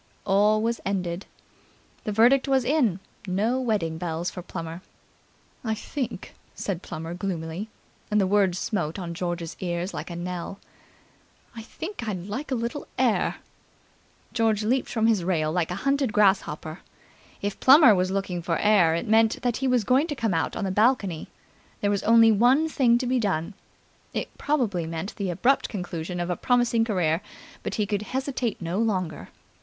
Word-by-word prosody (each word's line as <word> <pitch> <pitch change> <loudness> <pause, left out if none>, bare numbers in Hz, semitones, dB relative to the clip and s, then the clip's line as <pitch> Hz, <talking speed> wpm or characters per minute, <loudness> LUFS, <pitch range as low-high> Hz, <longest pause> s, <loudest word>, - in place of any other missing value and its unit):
All 210 +2 +3
was 230 +1 -1
ended. 185 -2 -2 0.8
The 215 - -1
verdict 245 +6 +4
was 265 -2 +2
in. 245 - +2 0.3
No 215 +8 +1
wedding 190 -10 -1
bells 170 +1 -2
for 180 - -7
Plummer. 165 -1 -7 0.8
"I 220 -2 -1
think," 260 +4 -5 0.2
said 185 -4 -3
Plummer 165 -1 -6
gloomily, 180 +1 -4 0.4
and 210 - +2
the 195 - +3
words 190 -2 +2
smote 175 -5 -2
on 175 -3 -5
George's 175 -1 -4
ear 175 -1 -2
like - - -5
a 170 - -6
knell, 180 +2 -5 1.0
"I 225 - -6
think 320 - -7
I'd 185 -4 -4
like 255 +9 -5
a 265 - 0
little 235 +4 -4
air." - - +2 1.0
George 225 -3 +1
leaped 250 +4 +1
from 225 -2 0
his 220 -5 +3
rail 160 -4 0
like 170 -1 0
a 180 - -3
hunted 275 -3 +2
grasshopper. 190 -5 +1 0.6
If 205 0 -3
Plummer 270 -3 +8
was 185 -1 +1
looking 190 -2 -2
for 165 0 -1
air, 195 -6 +4
it 170 - -3
meant 220 +2 +3
that 245 -2 +1
he 270 - -1
was 250 -3 +2
going 260 +8 +3
to 295 - -3
come 225 -7 0
out 165 - -1
on - - -3
the 190 - -1
balcony. 205 -5 +1 0.5
There 205 - +2
was 200 - 0
only 230 0 +6
one 250 +9 +4
thing 250 -6 +3
to 255 - -2
be 250 +1 +1
done. 190 -4 -1 0.6
It - - -4
probably 225 - 0
meant 165 +5 -5
the 200 -3 -2
abrupt 250 +10 +2
conclusion 175 -3 -4
of 175 +1 -2
a - - 0
promising 240 0 +2
career, 175 -6 +1 0.4
but - - -4
he 210 - +1
could 205 0 -1
hesitate 255 0 -2
no 175 +3 -2
longer. 185 -8 -1
205 Hz, 170 wpm, -25 LUFS, 175-235 Hz, 1.0 s, Plummer